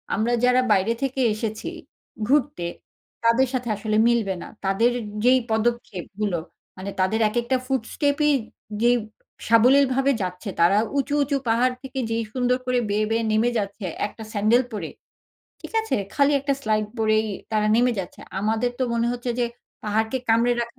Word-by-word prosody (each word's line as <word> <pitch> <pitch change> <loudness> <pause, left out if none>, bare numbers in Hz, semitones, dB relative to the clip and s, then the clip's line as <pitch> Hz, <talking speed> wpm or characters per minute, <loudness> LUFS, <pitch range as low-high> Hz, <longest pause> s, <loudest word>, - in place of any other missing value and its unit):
আমরা 225 +4 +1
যারা 250 +1 +5
বাইরে 205 +3 +3
থেকে 270 -1 -1
এসেছি 215 0 -4 0.6
ঘুরতে, 265 -10 +1 0.6
তাদের 235 +3 +4
সাথে 245 -2 -2
আসলে 215 +1 -1
মিলবে 225 -5 +2
না। - - -7 0.2
তাদের 225 +6 +3 0.3
যেই 255 +1 +5
পদক্ষেপগুলো, 210 -4 -1 0.4
মানে 195 +1 -5
তাদের 190 +4 +2
একেকটা 240 +3 0
ফুট 265 -2 0
স্টেপই 295 0 +2 0.5
যেই 240 +1 +5 0.5
সাবলীলভাবে 265 +4 +4
যাচ্ছে 180 +3 -4
,তারা 175 +4 +5 0.2
উঁচু, 280 +1 0
উঁচু 280 0 0
পাহাড় 250 +3 +3
থেকে 265 0 -5
যেই 225 0 0
সুন্দর 250 -1 +1
করে 250 -1 +1
বেয়ে 210 +1 +1
বেয়ে 225 +1 +1
নেমে 220 +3 +3
যাচ্ছে 200 -1 -4 0.2
একটা 220 - -11
স্যান্ডাল 220 +4 +3
পরে, 195 -7 -4 0.7
ঠিক - - -10
আছে, 445 - -1 0.2
খালি 285 0 +3
একটা 275 0 0
স্লাইড 215 -1 +1
পরেই 215 0 +2 0.3
তারা 215 0 +2
নেমে 245 +1 +3
যাচ্ছে। 180 - -6 0.2
আমাদের 225 +3 0
তো 260 - 0
মনে 235 0 +1
হচ্ছে 245 0 -3
যে, 240 - +2 0.4
পাহাড়কে 220 +4 0
কামড়ে 230 +2 +4
রাখা 235 +2 -5
230 Hz, 155 wpm, -24 LUFS, 215-255 Hz, 0.7 s, যারা